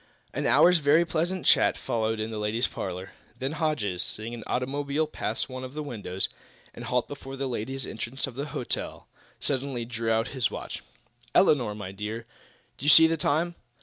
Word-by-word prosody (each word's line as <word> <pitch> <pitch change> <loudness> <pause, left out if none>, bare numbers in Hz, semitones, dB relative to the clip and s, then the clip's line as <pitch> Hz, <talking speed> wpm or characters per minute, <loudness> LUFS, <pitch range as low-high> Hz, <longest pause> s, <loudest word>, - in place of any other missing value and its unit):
An - - 0
hour's 180 0 +6
very 155 +3 +5
pleasant 170 +3 -1
chat - - +5
followed 110 -1 -1
in 110 +1 -2
the 110 - -3
ladies' 110 +4 +1
parlor. 95 +1 -4 0.3
Then 135 +2 -2
Hodges, 150 - 0
seeing 110 +2 -5
an 115 -2 -6
automobile 140 +4 0
pass 115 -7 -2
one 130 0 -6
of 130 +2 -7
the 155 - -3
windows 100 -9 -1 0.5
and - - -8
halt 125 -1 +1
before 135 -1 -7
the 135 0 -2
ladies' 130 +2 -3
entrance 120 +4 -3
of 135 - -7
the 140 +4 -3
hotel, 125 - -4 0.3
suddenly 135 -3 -1
drew 115 -1 -2
out 115 +2 +2
his 125 -4 +1
watch. - - -6 0.5
"Elinor, 120 -8 +4
my 100 -3 -6
dear, 105 +3 -5 0.5
do 140 - -5
you - - +5
see 160 +1 +10
the 165 0 +3
time?" 160 +3 +1
125 Hz, 180 wpm, -28 LUFS, 110-145 Hz, 0.5 s, see